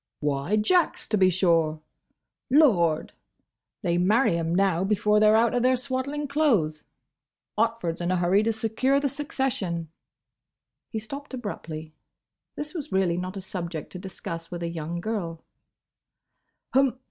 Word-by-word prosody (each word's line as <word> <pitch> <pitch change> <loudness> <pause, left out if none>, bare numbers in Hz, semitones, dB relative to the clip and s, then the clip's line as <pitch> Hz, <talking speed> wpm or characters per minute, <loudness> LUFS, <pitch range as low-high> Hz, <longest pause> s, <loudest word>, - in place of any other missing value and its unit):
"Why, 145 +6 0
Jack's, 335 +12 +2
to 215 - +2
be 185 -1 +5
sure!—Lord!—they 170 - 0
marry 210 +2 +3
'em 165 0 -1
now 190 -2 +2
before 210 +1 +2
they 215 - +5
're 215 - +5
out 230 +1 +3
of 245 - +1
their 255 +1 +4
swaddling 275 +3 -3
clothes. 225 - +1 0.7
Otford's 220 -7 0
in 175 - -1
a 185 - +2
hurry 180 +3 +3
to 225 +1 +1
secure 225 +5 +1
the 280 0 0
succession—" 250 - -2 1.0
He 225 - -4
stopped 275 +6 -6
abruptly. 160 -9 -6 0.6
This 300 +1 -6
was 315 - -6
really 190 -3 +2
not 185 +2 -4
a - - -5
subject 175 -4 -5
to 180 - -7
discuss 170 -3 -6
with 175 -1 -5
a 170 - -2
young 170 +1 -4
girl. 175 -6 -4
195 Hz, 135 wpm, -26 LUFS, 170-245 Hz, 1.0 s, be